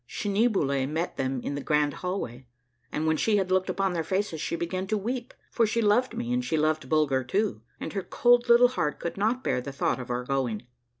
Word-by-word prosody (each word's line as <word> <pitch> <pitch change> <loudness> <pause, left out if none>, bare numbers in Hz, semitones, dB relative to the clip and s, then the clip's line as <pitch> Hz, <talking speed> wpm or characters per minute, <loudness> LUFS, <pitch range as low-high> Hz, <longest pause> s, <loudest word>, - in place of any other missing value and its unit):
Schneeboule 195 - +1
met 160 +3 -2
them 130 -1 -1
in - - -3
the 140 - -3
grand 150 -1 +1
hallway; 135 -10 -4 0.4
and 155 - -2
when 160 0 +2
she 215 +4 +2
had 190 -2 0
looked 185 0 +2
upon 195 -2 0
their 165 -2 -1
faces 185 -3 -2
she - - -2
began 185 +3 -3
to 215 - 0
weep, 240 +4 -3 0.2
for 230 -2 +2
she 225 +2 0
loved 230 +3 +2
me 240 0 -2
and 250 0 0
she 165 -10 0
loved 155 -3 0
Bulger 145 -4 +2
too, 195 - -1 0.2
and - - -5
her 195 - -1
cold 240 +5 +3
little 240 +1 +7
heart 150 -12 -2
could 170 - -4
not 225 +6 0
bear 125 - 0
the 140 - -6
thought 135 - 0
of 125 - -7
our 125 0 -1
going. 125 -4 -2
180 Hz, 225 wpm, -27 LUFS, 140-215 Hz, 0.4 s, little